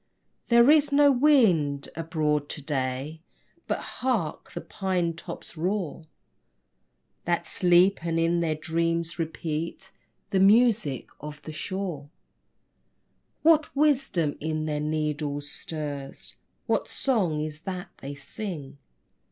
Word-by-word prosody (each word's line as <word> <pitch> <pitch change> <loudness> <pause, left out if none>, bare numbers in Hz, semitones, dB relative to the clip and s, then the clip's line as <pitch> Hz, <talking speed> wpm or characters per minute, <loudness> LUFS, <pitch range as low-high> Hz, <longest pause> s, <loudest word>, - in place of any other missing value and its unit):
There 235 +3 +6
is 300 -2 +4
no 285 0 +6
wind 215 - +3
abroad 155 -3 -1
to - - -5
day. 135 +2 -3 0.5
But - - 0 0.2
hark! 235 -12 -1
the - - -5
pine 185 -4 -1
tops' 170 +1 -8
roar, 175 -1 -2 1.2
That 170 0 0
sleep 180 0 +4
and 165 -1 -1
in 165 +1 +2
their 160 -2 0
dreams 165 +2 -1
repeat 165 +3 -4 0.4
The 190 - +2
music 205 - +4
of 150 0 -8
the 155 - -7
shore. 170 -4 -4 1.3
What 310 -2 +4
wisdom 270 - +2
in 155 0 -2
their 150 -1 -1
needles 150 -1 -2
stirs? 145 -3 -6 0.3
What - - 0
song 195 - 0
is 150 0 -5
that 185 0 -5
they 140 +1 -7
sing? 145 -2 -7
165 Hz, 115 wpm, -26 LUFS, 150-195 Hz, 1.3 s, There